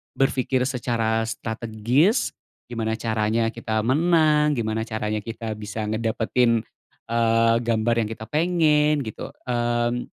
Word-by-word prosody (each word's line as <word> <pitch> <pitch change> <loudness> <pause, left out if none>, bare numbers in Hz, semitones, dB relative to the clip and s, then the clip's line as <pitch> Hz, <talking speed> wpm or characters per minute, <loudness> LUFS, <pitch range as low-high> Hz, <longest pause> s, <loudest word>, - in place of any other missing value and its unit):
berpikir 130 -1 +1
secara 115 -3 0
strategis, 115 - 0 0.4
gimana 110 -1 -1
caranya 110 0 0
kita 110 -2 -2
menang, 150 +2 +3
gimana 110 -2 -1
caranya 110 -1 -2
kita 115 0 -6
bisa 105 +1 -5
ngedapetin, 115 +1 +1 0.5
eee, 115 0 +3
gambar 115 0 +1
yang 105 - -5
kita 110 - -9
pengen, 150 -3 +2
gitu. 110 - -6 0.2
Mmm 120 0 0
115 Hz, 115 wpm, -23 LUFS, 110-130 Hz, 0.5 s, menang